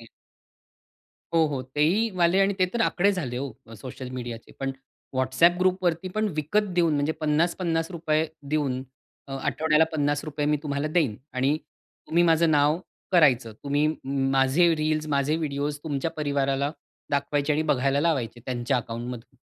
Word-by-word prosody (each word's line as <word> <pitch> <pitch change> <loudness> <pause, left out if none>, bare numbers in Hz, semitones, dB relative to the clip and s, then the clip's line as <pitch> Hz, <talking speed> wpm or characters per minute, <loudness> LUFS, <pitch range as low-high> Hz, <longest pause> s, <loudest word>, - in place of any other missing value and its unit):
हं. 115 - -13 1.3
हो, 165 -1 +5
हो. 140 -4 -3
तेहीवाले 180 +2 +3
आणि 195 +1 +3
ते 185 - +4
तर 235 - 0
आकडे 200 -3 +3
झाले 130 -10 -3
ओ, 135 +1 -4 0.2
अ, 115 - -11
सोशल 130 +3 -8
मीडियाचे. 120 -2 -7
पण 135 0 -1 0.4
WhatsApp 130 +7 +3
ग्रुपवरती, 185 -1 +1
पण 215 0 +1
विकत 160 +8 +1 0.2
देऊन 165 -3 +3
म्हणजे 145 +2 +1
₹50-50 165 0 0 0.2
देऊन 140 -4 0 0.5
अ, - - -7
आठवड्याला 160 0 +3
₹50 145 0 -1
मी 150 0 +3
तुम्हाला 145 0 -2
देईन 155 -9 +1 0.2
आणि 135 +4 +2 0.5
तुम्ही 170 +2 +3
माझं 165 0 +4
नाव 150 +1 +3 0.3
करायचं. 130 -9 +4
तुम्ही 145 +2 +2 0.4
माझे 135 +6 +4
रील्स, 155 0 -1
माझे 145 +2 +1
व्हिडिओस 145 -1 -2
तुमच्या 150 0 -2
परिवाराला 140 -2 0 0.4
दाखवायचे 145 +1 0
आणि 155 +2 +1
बघायला 135 +1 +2
लावायचे. 135 -8 0
त्यांच्या 125 +1 0
अकाउंटमधून 120 +1 -6
150 Hz, 140 wpm, -26 LUFS, 135-165 Hz, 1.3 s, हो